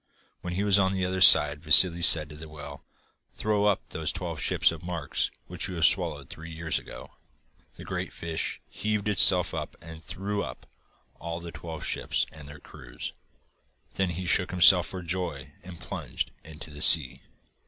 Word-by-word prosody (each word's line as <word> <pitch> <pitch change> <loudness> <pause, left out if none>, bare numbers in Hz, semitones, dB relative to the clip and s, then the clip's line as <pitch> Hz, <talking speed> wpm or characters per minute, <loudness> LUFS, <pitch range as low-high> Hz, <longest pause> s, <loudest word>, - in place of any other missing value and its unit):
When 90 - -7
he 95 +3 -3
was 100 -1 +2
on 95 0 0
the 95 -1 -3
other 95 0 -4
side 75 -4 +6
Vassili 85 +2 +6
said 85 -3 +6
to 75 - -12
the 80 +1 -12
whale: 75 -2 -11 0.5
'Throw 105 -1 -1
up 105 -2 -1
those 80 0 -3
twelve 85 -3 -7
ships - - 0
of 80 -2 -10
Mark's 85 -4 -4 0.2
which 90 +1 -6
you 90 -3 -7
swallowed 75 -6 +1
three 80 +4 -11
years 80 -1 -2
ago.' - - -13 0.6
The - - -13
great - - -6
fish 80 -1 -5
heaved 105 -1 -4
itself 90 -3 +5
up - - -7
and 80 -1 -13
threw 100 +4 -5
up - - -10 0.5
all 85 +1 -7
the 85 0 -10
twelve 80 -3 -9
ships - - -2
and 75 -2 -13
their 75 +1 -13
crews. - - -11 0.8
Then 95 -1 -2
he 90 +2 -6
shook 90 0 0
himself 90 0 +4
for 95 -1 -8
joy, 85 -5 -6
and 90 -2 -13
plunged - - -6
into 75 0 -10
the 75 0 -9
sea. 70 -6 +7
85 Hz, 175 wpm, -25 LUFS, 75-95 Hz, 0.8 s, sea